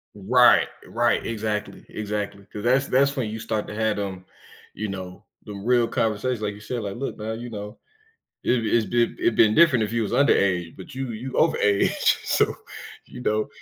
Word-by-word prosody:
Right, 120 +5 +5 0.2
right, - - +1
exactly, 105 -2 -3
exactly, 105 -1 -4
'cause 105 - -7
that's 130 +3 +2
that's 140 +2 +2
when 120 -5 -2
you 110 +1 -5
start 110 -2 -3
to 105 - -7
have 110 -1 0
them, 95 -2 -5 0.5
you 110 +2 -4
know, 95 -2 -7 0.2
them 100 -2 -8
real 120 0 +3
conversations 110 +2 -1
like 105 -1 -2
you - - -12
said, 120 +2 -4
like, 100 -1 -5
look 135 +3 -4
now, 110 +1 -4
you 120 +2 -6
know, 105 0 -7 0.7
it 120 -3 +1
it's 110 +1 +2
been 120 0 +1
it'd 115 - +1
been 110 -1 +5
different 155 -9 +5
if 105 - -3
he 115 0 0
was 105 - -2
underage, 95 -10 +2
but 95 +7 -11
you 130 -2 -4
you 125 +4 -6
overage, 105 -11 +2
so - - +2 0.5
you 125 - -10
know, 110 0 0
110 Hz, 190 wpm, -24 LUFS, 105-120 Hz, 0.7 s, Right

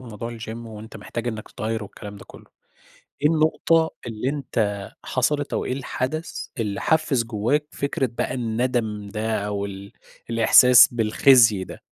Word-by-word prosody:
بموضوع 115 -1 -7
الGym 110 - -8 0.2
وأنت 110 0 -10
محتاج 115 +3 -5
إنك 110 -2 -6
تتغير 110 +1 -3
والكلام 105 0 -10
ده - - -12
كلّه، - - -15 0.8
إيه 150 - +5
النقطة 160 +1 +2 0.2
اللي 115 +2 -3
أنت 110 -8 -2
حصلِت 145 +3 -1
أو - - -1
إيه - - -3
الحدث 135 +4 -4
اللي 105 -3 -2
حفّز 155 -6 +1
جواك 120 +7 -1
فكرة 140 0 -1
بقى 120 +2 -3
الندم 115 -3 -2
ده 110 +2 -2
أو 100 -1 -2
ال 100 0 -8 0.4
الإحساس 125 +2 +7
بالخزي 115 -2 +4
ده؟ - - -11
115 Hz, 145 wpm, -23 LUFS, 105-130 Hz, 0.8 s, الإحساس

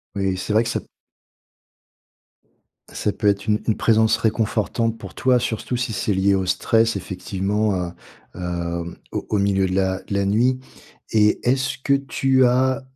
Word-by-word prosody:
Oui, 95 -1 0
c'est 95 +3 -4
vrai 110 +2 +4
que 115 - -3
ça - - -2 2.1
ça 105 - -1
peut 105 +1 -1
être 100 -1 +2
une 105 0 +2
une 110 - +1
présence 110 -1 +3
réconfortante 115 +1 0
pour 95 -4 -10
toi, 125 -1 +3
surtout 120 +1 -2
si 125 -2 -2
c'est 105 - 0
lié 95 +1 +3
au 95 - 0
stress, 115 +5 +2
effectivement, 100 +3 -2
à, 90 -1 -3 0.4
hem, 85 -1 -4 0.2
au - - -4
au 105 - +1
milieu 100 -1 +2
de 95 - -3
la 95 -1 0
de - - -6
la 100 0 +1
nuit. 120 +6 +2 0.5
Et, 105 -1 +3
est-ce 135 +1 0
que 140 +1 0
tu 135 -1 +2
as 130 +2 +2
105 Hz, 165 wpm, -22 LUFS, 95-115 Hz, 2.1 s, vrai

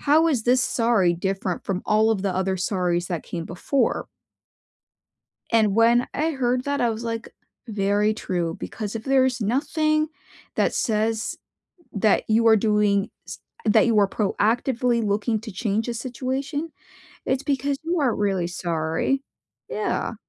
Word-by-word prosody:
"How 315 +3 +4
is 260 -8 +1
this 250 +2 +3
sorry 225 -7 +2
different 190 0 -3
from 190 -1 -2
all 215 +1 +3
of 205 -4 0
the 195 -2 -1
other 190 0 0
sorry's 180 -2 0
that 175 -3 -3
came 170 -2 -5
before?" 225 +10 -1 1.4
And 215 -3 +3
when 235 +2 +4
I 315 +2 +1
heard 250 -2 0
that, 285 0 -1
I 240 -1 +2
was 225 +1 -5
like, 230 0 -4 0.3
"Very 205 0 +1
true." 175 -5 -2
Because 210 -1 -5
if 225 0 -5
there's 260 -2 +2
nothing 310 +7 +1 0.5
that - - +1
says 220 0 0 0.6
that 210 0 +2
you 225 +1 +4
are 220 - +7
doing 210 -1 +2 0.2
s - - -8 0.3
that 215 - +5
you 225 - +3
are 200 - +4
proactively 235 +4 +1
looking 210 +2 0
to 220 -1 -8
change 215 +3 -1
a 240 - -2
situation, 265 +6 -3 0.5
it's 265 +1 0
because 275 0 0
you 340 0 0
aren't 255 -5 +1
really 195 -4 0
sorry 170 +8 -1 0.5
Yeah. - - -2
225 Hz, 150 wpm, -24 LUFS, 200-255 Hz, 1.4 s, are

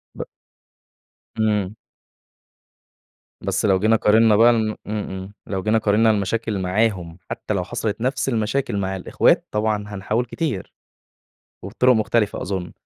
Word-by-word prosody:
ب - - -4 1.2
إمم. 105 -2 0 1.7
بس - - -1
لو 95 -2 +3
جينا 110 +3 +3
قارننا 110 0 +4
بقى 115 +3 +6
ن - - +1
إمم، - - -4
إمم، 100 -2 -5
لو 95 -2 -3
جينا 110 +1 +2
قارننا 110 +1 +3
المشاكل 105 +1 -1
معاهم، 90 -3 -1
حتّى - - -3
لو 95 -3 -1
حصلت 110 +4 -4
نفس 130 +2 0
المشاكل 115 0 -1
مع 95 -1 -2
الأخوات 95 - +2
طبعًا 105 -1 0
هنحاول 105 +4 -2
كتير. 125 - -4 0.9
وبطرق 120 +6 +2
مختلفة 110 -2 0
أظن 95 -2 -4
105 Hz, 130 wpm, -22 LUFS, 95-115 Hz, 1.7 s, بقى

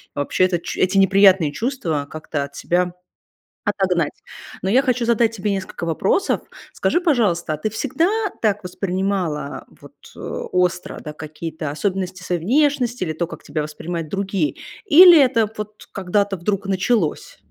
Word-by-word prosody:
вообще-то, 175 +5 +1
ч - - -6
эти 185 +2 +2
неприятные 195 -4 +5
чувства 165 - -2
как-то 155 -2 -4
от 140 0 -15
себя 175 0 0 0.7
отогнать. 185 -6 0 0.5
Но 190 - 0
я 255 +6 +5
хочу 250 -3 0
задать 230 -1 +2
тебе 205 0 -2
несколько 190 -3 -4
вопросов. 190 - +1 0.3
Скажи, 350 - +1
пожалуйста, 210 - +1
а - - -3
ты 215 - -2
всегда 280 +9 0 0.3
так 210 -2 +1
воспринимала 180 -5 -2 0.2
вот - - -14 0.2
остро, 180 0 -2
да, 150 - -7
какие-то 155 0 -6
особенности 185 +2 -3
своей 180 -2 -2
внешности 250 - +1
или 160 -3 -2
то, 165 +1 -2
как - - -10
тебя 155 - -3
воспринимают 155 +1 -5
другие? 195 -6 -1 0.3
Или 345 +1 +9
это 230 -5 +2
вот 210 0 -8
когда-то 200 +1 0
вдруг 195 +3 -2
началось? 195 -3 0
190 Hz, 145 wpm, -21 LUFS, 170-215 Hz, 0.7 s, Или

